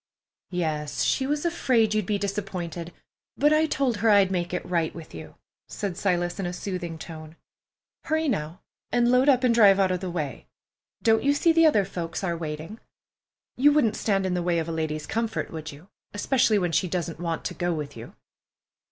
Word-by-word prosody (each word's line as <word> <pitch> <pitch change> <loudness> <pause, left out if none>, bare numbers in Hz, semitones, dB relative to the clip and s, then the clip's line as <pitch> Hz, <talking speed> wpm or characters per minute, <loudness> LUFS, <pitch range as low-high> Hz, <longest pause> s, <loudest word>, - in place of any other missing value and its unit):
"Yes, 155 -5 -2
she 265 - +1
was 295 +3 -1
afraid 245 -10 +2
you'd 215 -3 0
be 210 - +1
disappointed, 185 -4 -4 0.5
but 295 +1 +4
I 310 +1 +3
told 265 -6 0
her 225 +2 +2
I'd 200 -2 +5
make 175 -2 -1
it 180 - -3
right 170 -3 0
with 165 -2 -10
you," - - -10 0.3
said 200 -4 -4
Silas, 175 -1 -1
in 190 - -1
a 175 - -4
soothing 175 -3 -5
tone. 155 0 -10 0.7
"Hurry, 315 0 0
now, 160 - -2 0.3
and 240 0 +3
load 255 +3 +4
up 260 -2 +4
and 245 -2 +4
drive 200 -4 +6
out 190 -1 +3
of 180 - -1
the 185 0 -4
way. 155 -6 -4 0.6
Don't 225 -1 +4
you 285 +1 +2
see 330 +3 +3
the 330 0 +6
other 210 -10 +3
folks 175 -1 -5
are 175 -3 -1
waiting? 160 +6 -6 0.8
You 285 +4 +5
wouldn't 230 -8 +2
stand 195 -3 0
in 185 - 0
the 180 - 0
way 175 -1 +1
of 165 -1 -1
a - - -3
lady's 155 -2 -3
comfort, 225 0 -2
would 160 -1 -6
you, 150 +6 -14 0.3
especially 230 0 +2
when 175 -3 0
she 185 - +1
doesn't 170 -2 -3
want 165 -2 -3
to - - -2
go 175 +1 -1
with 150 -3 -4
you?" 115 +1 -10
185 Hz, 200 wpm, -26 LUFS, 165-230 Hz, 0.8 s, drive